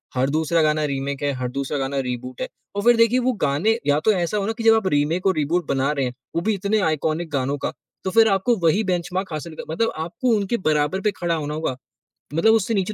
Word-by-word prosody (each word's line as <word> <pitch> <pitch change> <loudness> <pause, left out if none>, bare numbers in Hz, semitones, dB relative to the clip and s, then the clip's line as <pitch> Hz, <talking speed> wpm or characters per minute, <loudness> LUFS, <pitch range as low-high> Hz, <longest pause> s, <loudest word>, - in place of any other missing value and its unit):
हर 130 +1 +1
दूसरा 160 +2 +1
गाना 155 0 +2
रीमेक 140 -1 -3
है, 145 - +1
हर 125 -1 -3
दूसरा 140 +2 -3
गाना 135 0 -1
रीबूट 125 0 -6
है। - - -1 0.3
और 205 - -1
फ़िर 240 +1 +6
देखिए 230 +2 +4
वो 255 +1 +1
गाने 165 +11 +1
या 145 +1 +3
तो 220 - +6
ऐसा 180 +2 -1
हो 195 - -1
ना 220 - 0
कि 230 - -4
जब 225 0 +6
आप 220 -4 0
रीमेक 155 +3 +1
और 190 - +3
रीबूट 155 +3 0
बना 135 +1 +1
रहे 140 -3 -1
हैं, 125 - -3 0.2
वो 170 - +1
भी 215 +5 +1
इतने 200 +2 0
आइकॉनिक 160 +2 -1
गानों 140 0 -1
का, - - -3 0.3
तो 190 - -1
फ़िर 225 +3 +6
आपको 200 +5 +2
वही 180 +7 +3
बेंचमार्क 180 0 -2
हासिल 155 +1 -6
कर 155 - -7
मतलब 225 +7 +1
आपको 225 +10 0
उनके 205 +4 -1
बराबर 150 +5 +1
पे 210 - +1
खड़ा 175 -1 0
होना 150 -2 -3
होगा, 155 -4 -2 0.6
मतलब 195 +8 +4
उससे 225 0 +1
नीचे 195 0 0
165 Hz, 245 wpm, -22 LUFS, 145-205 Hz, 0.6 s, फ़िर